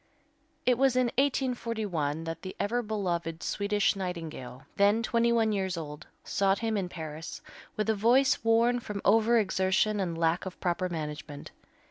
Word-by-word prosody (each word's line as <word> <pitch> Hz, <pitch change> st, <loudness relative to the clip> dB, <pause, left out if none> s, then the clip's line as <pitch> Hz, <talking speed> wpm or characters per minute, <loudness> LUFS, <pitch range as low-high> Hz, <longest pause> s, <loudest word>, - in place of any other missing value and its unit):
It 250 Hz, -1 st, +3 dB
was 270 Hz, -2 st, +4 dB
in 250 Hz, -2 st, +2 dB
1841 220 Hz, -, -1 dB
that 165 Hz, 0 st, -5 dB
the 185 Hz, -, -7 dB
ever 240 Hz, +4 st, 0 dB
beloved 175 Hz, -7 st, -3 dB
Swedish 205 Hz, 0 st, +1 dB
Nightingale, 165 Hz, -9 st, -6 dB
then 205 Hz, +3 st, +3 dB
twenty 235 Hz, 0 st, +2 dB
one 225 Hz, -2 st, +3 dB
years 190 Hz, -3 st, -1 dB
old, 150 Hz, -2 st, -7 dB, 0.2 s
sought 195 Hz, 0 st, +1 dB
him 225 Hz, -1 st, -1 dB
in 190 Hz, -3 st, -1 dB
Paris, 160 Hz, -1 st, -7 dB, 0.4 s
with 215 Hz, -, 0 dB
a 220 Hz, -, +3 dB
voice 240 Hz, +6 st, +3 dB
worn 230 Hz, +2 st, +3 dB
from 210 Hz, -4 st, -6 dB
over 225 Hz, +3 st, +5 dB
exertion 205 Hz, 0 st, +1 dB
and 175 Hz, -4 st, -2 dB
lack 165 Hz, +3 st, +1 dB
of 185 Hz, -, -8 dB
proper 180 Hz, +1 st, -1 dB
management. 150 Hz, -3 st, -6 dB
200 Hz, 155 wpm, -29 LUFS, 170-230 Hz, 0.4 s, over